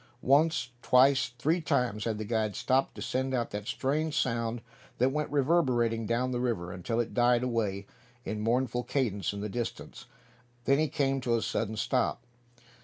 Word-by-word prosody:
Once, 145 Hz, -1 st, +3 dB
twice, 130 Hz, +1 st, +4 dB
three 160 Hz, +8 st, +1 dB
times 120 Hz, -8 st, 0 dB
had 110 Hz, -2 st, -1 dB
the 110 Hz, -, -4 dB
guide 110 Hz, -2 st, -1 dB
stopped 130 Hz, +1 st, +1 dB
to -, -, -6 dB
send 130 Hz, +1 st, -1 dB
out 120 Hz, -2 st, -1 dB
that 105 Hz, +1 st, -5 dB
strange 150 Hz, +4 st, 0 dB
sound 115 Hz, -1 st, -1 dB, 0.4 s
that 130 Hz, +2 st, +3 dB
went 150 Hz, +1 st, -2 dB
reverberating 130 Hz, -7 st, +2 dB
down 125 Hz, +3 st, 0 dB
the 125 Hz, -, -1 dB
river, 110 Hz, -8 st, -2 dB
until 95 Hz, +6 st, -2 dB
it 120 Hz, -, -2 dB
died 120 Hz, 0 st, +3 dB
away 105 Hz, -5 st, -1 dB, 0.4 s
in 105 Hz, 0 st, -3 dB
mournful 120 Hz, +2 st, +1 dB
cadence 120 Hz, -7 st, -1 dB
in 100 Hz, 0 st, -6 dB
the 105 Hz, -, -2 dB
distance. 120 Hz, +3 st, -5 dB, 0.6 s
Then 140 Hz, +1 st, +4 dB
he 155 Hz, -, +2 dB
came 135 Hz, -2 st, 0 dB
to 120 Hz, -2 st, +1 dB
a 115 Hz, -, 0 dB
sudden 110 Hz, -1 st, -2 dB
stop. 125 Hz, +1 st, 0 dB
120 Hz, 175 wpm, -29 LUFS, 115-135 Hz, 0.6 s, twice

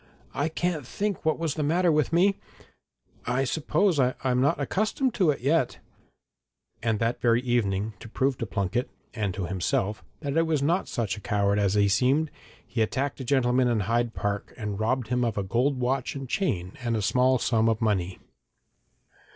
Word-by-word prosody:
'I 145 Hz, +3 st, 0 dB
can't 160 Hz, -4 st, -2 dB
think 205 Hz, +4 st, -2 dB
what 155 Hz, -, +1 dB
was 165 Hz, -4 st, -1 dB
the 155 Hz, -, -3 dB
matter 170 Hz, +4 st, +2 dB
with 150 Hz, 0 st, +1 dB
me 190 Hz, +4 st, +4 dB, 0.9 s
I 125 Hz, +2 st, +1 dB
suppose 160 Hz, +5 st, +1 dB
I'm 125 Hz, 0 st, +1 dB
not 140 Hz, -, +3 dB
quite 140 Hz, -, -3 dB
accustomed 215 Hz, -, 0 dB
to 185 Hz, -6 st, +2 dB
it 145 Hz, -, 0 dB
yet.' 140 Hz, 0 st, +1 dB, 1.0 s
And 115 Hz, -1 st, +1 dB
that 115 Hz, +2 st, -1 dB
very 120 Hz, 0 st, +3 dB
evening, 110 Hz, -4 st, 0 dB
to 115 Hz, -, -10 dB
prove 135 Hz, +4 st, 0 dB
to 115 Hz, -, -3 dB
Plunket 100 Hz, +6 st, -1 dB, 0.2 s
and 105 Hz, -6 st, -2 dB
himself 95 Hz, +2 st, -1 dB, 0.2 s
that 140 Hz, -3 st, -2 dB
he 165 Hz, -, +4 dB
was 160 Hz, -4 st, 0 dB
not 170 Hz, +6 st, +1 dB
such 105 Hz, -5 st, -2 dB
a -, -, -9 dB
coward 100 Hz, -2 st, +1 dB
as 100 Hz, -1 st, +1 dB
he 100 Hz, -1 st, +4 dB
seemed, 130 Hz, +10 st, +2 dB, 0.3 s
he 120 Hz, -, -2 dB
attacked 135 Hz, +6 st, -1 dB
a -, -, -4 dB
gentleman 125 Hz, -1 st, +2 dB
in 115 Hz, -3 st, +1 dB
Hyde 115 Hz, +3 st, 0 dB
Park 100 Hz, 0 st, -3 dB
and 105 Hz, -3 st, -4 dB
robbed 115 Hz, +1 st, 0 dB
him 125 Hz, 0 st, +1 dB
of 115 Hz, -3 st, -1 dB
a 100 Hz, -, 0 dB
gold 125 Hz, +7 st, 0 dB
watch 130 Hz, +2 st, -1 dB
and 135 Hz, -1 st, -5 dB
chain 95 Hz, -, -1 dB
and 120 Hz, -2 st, 0 dB
a 105 Hz, -, -2 dB
small 130 Hz, +5 st, +3 dB
sum 115 Hz, -2 st, +2 dB
of 110 Hz, -1 st, 0 dB
money. 95 Hz, -5 st, 0 dB
125 Hz, 185 wpm, -26 LUFS, 105-145 Hz, 1.0 s, me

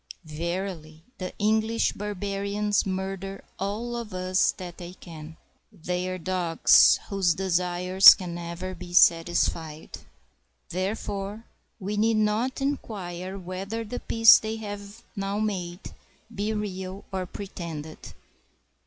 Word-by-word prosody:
Verily, 165 Hz, 0 st, -5 dB, 0.2 s
the 185 Hz, -1 st, -4 dB
English 220 Hz, +2 st, +1 dB
barbarians 205 Hz, 0 st, -1 dB
murder 195 Hz, +1 st, -4 dB, 0.2 s
all 215 Hz, +5 st, -3 dB
of 230 Hz, -5 st, -6 dB
us 185 Hz, +1 st, +2 dB
that 180 Hz, -2 st, -9 dB
they 175 Hz, 0 st, -8 dB
can. 160 Hz, -3 st, -11 dB, 0.3 s
They 180 Hz, +2 st, -3 dB
are 185 Hz, -, -3 dB
dogs, 180 Hz, -2 st, +4 dB
whose 190 Hz, -4 st, +2 dB
desires 180 Hz, +1 st, +6 dB
can 180 Hz, -2 st, -6 dB
never 175 Hz, +2 st, -5 dB
be 175 Hz, 0 st, -10 dB
satisfied. 165 Hz, -2 st, +2 dB, 0.7 s
Therefore 200 Hz, +3 st, -3 dB, 0.3 s
we 205 Hz, +1 st, -3 dB
need 220 Hz, +1 st, +3 dB
not 215 Hz, +6 st, 0 dB
inquire 195 Hz, -9 st, -4 dB
whether 195 Hz, +5 st, -5 dB
the 235 Hz, +3 st, -5 dB
peace 225 Hz, -1 st, +7 dB
they 220 Hz, 0 st, -4 dB
have 205 Hz, +1 st, -8 dB
now 195 Hz, 0 st, -2 dB
made 190 Hz, -4 st, -3 dB, 0.4 s
be 205 Hz, +1 st, -2 dB
real 195 Hz, -2 st, -5 dB
or 185 Hz, -2 st, -3 dB
pretended. 165 Hz, -6 st, -7 dB
190 Hz, 115 wpm, -26 LUFS, 175-210 Hz, 0.7 s, peace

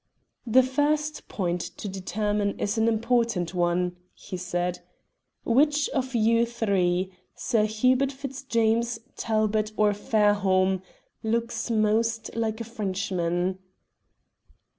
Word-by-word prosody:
"The 255 Hz, +3 st, +6 dB
first 295 Hz, +3 st, 0 dB
point 175 Hz, -3 st, -2 dB
to 205 Hz, -, -7 dB
determine 205 Hz, +2 st, -2 dB
is 205 Hz, -, -1 dB
an 225 Hz, 0 st, +2 dB
important 230 Hz, -5 st, +1 dB
one," 175 Hz, 0 st, 0 dB, 0.2 s
he 195 Hz, -, -8 dB
said. 180 Hz, 0 st, -2 dB, 0.7 s
"Which 290 Hz, +4 st, +3 dB
of 260 Hz, -2 st, -2 dB
you 230 Hz, +1 st, +4 dB
three 190 Hz, -5 st, 0 dB, 0.2 s
Sir 215 Hz, -2 st, +1 dB
Hubert 255 Hz, +5 st, +2 dB
Fitzjames, 240 Hz, -4 st, 0 dB, 0.2 s
Talbot, 215 Hz, -1 st, 0 dB
or 210 Hz, -1 st, +4 dB
Fairholme 200 Hz, -3 st, +2 dB, 0.4 s
looks 230 Hz, +1 st, -1 dB
most 225 Hz, +1 st, +1 dB
like 225 Hz, -1 st, -1 dB
a -, -, -3 dB
Frenchman?" 185 Hz, -4 st, -2 dB
215 Hz, 105 wpm, -26 LUFS, 190-235 Hz, 0.7 s, The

